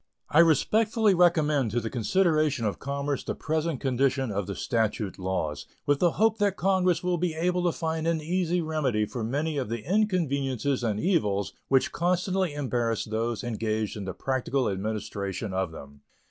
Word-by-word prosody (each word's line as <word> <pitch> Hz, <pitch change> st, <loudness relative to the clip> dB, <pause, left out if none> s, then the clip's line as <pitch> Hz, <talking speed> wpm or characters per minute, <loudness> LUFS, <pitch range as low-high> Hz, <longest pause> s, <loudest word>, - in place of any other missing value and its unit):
I 155 Hz, -, +5 dB
respectfully 210 Hz, -, +4 dB
recommend 155 Hz, -7 st, +3 dB
to 120 Hz, +3 st, 0 dB
the 115 Hz, -1 st, -5 dB
consideration 155 Hz, -, +1 dB
of 105 Hz, -, -2 dB
Congress 140 Hz, 0 st, -2 dB
the -, -, -3 dB
present 160 Hz, -2 st, -1 dB
condition 135 Hz, -1 st, +1 dB
of 100 Hz, -1 st, -2 dB
the 100 Hz, -, -4 dB
statute 110 Hz, -4 st, -1 dB
laws, 90 Hz, -5 st, -2 dB, 0.2 s
with 145 Hz, -1 st, +2 dB
the 175 Hz, -2 st, +3 dB
hope 220 Hz, +1 st, +2 dB
that 200 Hz, -2 st, +1 dB
Congress 185 Hz, -2 st, +2 dB
will 180 Hz, -1 st, 0 dB
be 170 Hz, -2 st, -1 dB
able 180 Hz, +2 st, 0 dB
to 175 Hz, -, +3 dB
find 160 Hz, 0 st, -2 dB
an 165 Hz, -1 st, +1 dB
easy 175 Hz, +2 st, 0 dB
remedy 140 Hz, -9 st, 0 dB
for 115 Hz, +2 st, -5 dB
many 145 Hz, +6 st, -1 dB
of 130 Hz, -6 st, -2 dB
the 115 Hz, -2 st, -4 dB
inconveniences 140 Hz, -, 0 dB
and 105 Hz, -3 st, 0 dB
evils 105 Hz, -, +1 dB
which 135 Hz, -1 st, +3 dB
constantly 180 Hz, -1 st, 0 dB
embarrass 120 Hz, -5 st, -1 dB
those 115 Hz, +1 st, -2 dB
engaged 110 Hz, -2 st, -2 dB
in 105 Hz, -2 st, -5 dB
the 95 Hz, -, -5 dB
practical 130 Hz, 0 st, -1 dB
administration 100 Hz, -1 st, -3 dB
of 95 Hz, -2 st, -1 dB
them. 70 Hz, -2 st, -12 dB
140 Hz, 170 wpm, -27 LUFS, 110-170 Hz, 0.2 s, I